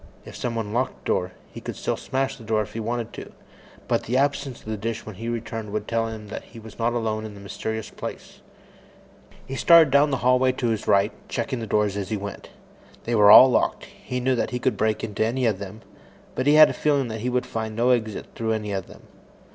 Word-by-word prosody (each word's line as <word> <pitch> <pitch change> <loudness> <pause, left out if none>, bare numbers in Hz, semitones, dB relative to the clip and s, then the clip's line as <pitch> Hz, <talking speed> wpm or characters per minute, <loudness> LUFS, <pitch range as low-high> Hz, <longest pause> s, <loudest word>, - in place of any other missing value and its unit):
If - - -10
someone 115 -3 -3
locked 125 +3 -2
the - - -6
door, 90 0 0 0.2
he - - -9
could - - -6
still - - -2
smash 135 0 -2
in - - -11
the - - -6
glass 110 -1 +1
if - - -17
he 115 - -4
wanted 115 +1 -3
to, - - -9 0.6
but - - 0
the 125 +3 0
absence 140 -2 0
of - - -19
the 110 0 -3
dish 110 +2 -4
when 110 - -7
he 115 +3 -4
returned 115 -2 -4
would 105 0 -3
tell 115 0 0
him 110 -2 -8
that - - -5
he 115 - -15
was 110 0 -13
not 115 +1 +1
alone 110 -2 -1
in 110 -1 -8
this 100 - -12
mysterious 110 +2 -5
place. - - -8 1.0
He 135 - -6
started 165 0 +6
down 140 +2 +5
the 135 - 0
hallway 130 0 +4
to 125 -2 -1
his 110 -2 -2
right, 100 +1 +4 0.2
checking 125 +1 -2
the 115 - -5
doors 105 -1 +1
as 100 -2 -4
he 110 - -1
went. 100 0 -7 0.5
They 120 - -2
were 105 -2 +6
all 130 +5 +10
locked. - - +1
He 125 - -6
knew 130 +1 +1
that 115 - -1
he 125 - -3
could 130 +1 0
break 110 -1 0
into 110 -1 -1
any 125 +3 0
of 105 -5 +1
them, 100 +3 -8 0.5
but 130 - -2
he 145 - +6
had 155 -1 +8
a - - -5
feeling 145 -4 +1
that 110 -1 -5
he 125 - -1
would 125 0 0
find 110 -1 -4
no 120 +3 +3
exit 110 -4 -1
through 110 -1 -1
any 105 -2 -3
of 95 -2 -3
them. - - -15
115 Hz, 245 wpm, -24 LUFS, 110-125 Hz, 1.0 s, all